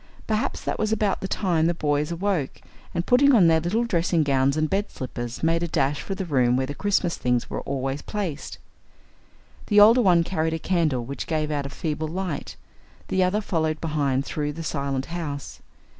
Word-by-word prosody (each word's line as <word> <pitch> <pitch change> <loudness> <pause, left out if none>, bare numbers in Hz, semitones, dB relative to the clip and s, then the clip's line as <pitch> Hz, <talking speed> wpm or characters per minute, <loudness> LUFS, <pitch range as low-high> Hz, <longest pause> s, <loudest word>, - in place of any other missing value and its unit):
Perhaps 220 +5 -1
that - - -3
was 215 0 0
about 210 -3 0
the 190 - -2
time 170 -5 +1
the 170 - +2
tiny - - -15
boys 145 +1 0
awoke, 170 -5 -1 0.3
and, 170 - -2
putting 270 +2 +5
on 195 -6 +6
their 165 -1 +5
little 185 +9 0
dressing 170 -6 +1
gowns 140 0 +2
and 155 0 +1
bed 200 +5 -1
slippers, 120 -1 -6
made 165 +1 +2
a 170 - -1
dash 145 -3 0
for 195 - -4
the 190 -1 -4
room 125 -6 +2
where 130 - 0
the 145 - -5
Christmas 190 0 0
things 125 -1 0
were - - -3
always 135 +1 -3
placed. 180 -8 -4 1.1
The 205 -1 +5
older 225 +4 +7
one 175 -6 +4
carried 160 -2 -1
a - - -1
candle 160 -8 0
which 140 +3 -5
gave 155 -2 -1
out 145 -2 -2
a - - -9
feeble 155 +1 -3
light. 175 -1 -4 0.5
The 190 0 +2
other 190 +4 +1
followed 160 -5 -1
behind 140 -4 0
through 150 -1 -3
the 165 +2 -6
silent 140 -3 -2
house. 160 -5 -6
160 Hz, 200 wpm, -24 LUFS, 140-190 Hz, 1.1 s, older